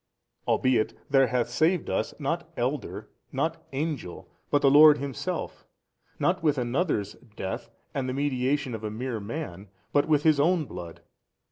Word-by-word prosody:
albeit 125 -4 +2 0.2
there 135 -2 +5
hath 120 0 0
saved 160 +8 +1
us, - - -1
not - - -2
elder, - - -3 0.2
not - - -2
angel, 140 - -4 0.2
but 145 - +2
the 135 - +6
Lord 150 +1 +9
Himself, 140 -4 -4 0.5
not 180 +1 +1
with 150 -3 +2
another's 125 - 0 0.2
death 95 - -4 0.2
and 130 -2 -2
the - - -2
mediation 135 -1 0
of 110 -1 -6
a 105 - -2
mere 115 +2 -4
man 100 - -6 0.2
but, 145 +1 +3
with 150 -2 +3
His 155 -3 +4
own 165 +1 +3
Blood. 85 -7 -9
135 Hz, 150 wpm, -27 LUFS, 120-150 Hz, 0.5 s, Lord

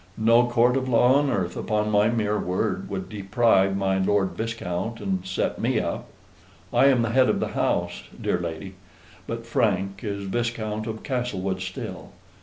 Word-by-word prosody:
No 115 +2 +4
court 120 +1 +3
of 130 -1 -2
law 125 +3 +5
on 145 -1 +1
earth, 90 -6 -1
upon 105 0 -1
my 105 +1 +4
mere 105 -2 0
word, 90 +1 -2
would 95 -1 -4
deprive 100 -2 +2
my 95 -1 +1
Lord 95 0 +2
Viscount 115 -1 -4
and 95 -2 -2
set - - -2
me - - +1
up. - - -3 0.7
I - - +5
am 130 -4 +4
the 115 - -1
head 130 +1 +4
of - - +1
the - - -1
house, - - -1 0.2
dear 90 - 0
lady; 85 +3 -5 0.5
but 115 0 -5
Frank 100 -4 0
is 100 -1 -3
Viscount 110 0 -2
of 110 -1 -5
Castlewood 100 -8 -2
still. 95 0 -6
105 Hz, 170 wpm, -25 LUFS, 95-115 Hz, 0.7 s, law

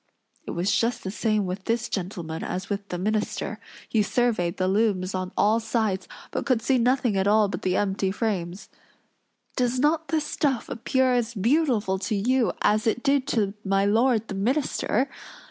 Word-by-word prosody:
It - - -3
was 195 +4 +1
just 235 +1 0
the 190 - -3
same 215 -1 0
with 185 +1 -5
this 230 +1 0
gentleman 175 -4 -4
as 190 +3 -4
with 200 0 -3
the 175 - -3
minister; 210 +3 -2 0.3
he 220 - +2
surveyed 210 -4 0
the 185 - +1
looms 195 -2 +1
on 185 0 -3
all 215 +2 +4
sides, 220 -4 -1 0.2
but - - -2
could 255 -4 +2
see 260 +1 +2
nothing 245 -2 +2
at 190 0 +1
all 210 0 +4
but 200 - -5
the 185 0 0
empty 195 -1 0
frames. 190 -3 -3 0.9
"Does 250 -1 +1
not 310 +3 +2
the 320 - +1
stuff 290 -4 -1
appear 255 +2 +1
as 235 -1 0
beautiful 225 - +1
to 210 - -2
you, 245 +4 +2
as 215 +3 +2
it 230 +2 0
did 275 -1 +2
to 210 -8 0
my 195 0 +2
lord 225 +1 +2
the - - -5
minister?" 255 +3 0
215 Hz, 180 wpm, -25 LUFS, 195-245 Hz, 0.9 s, all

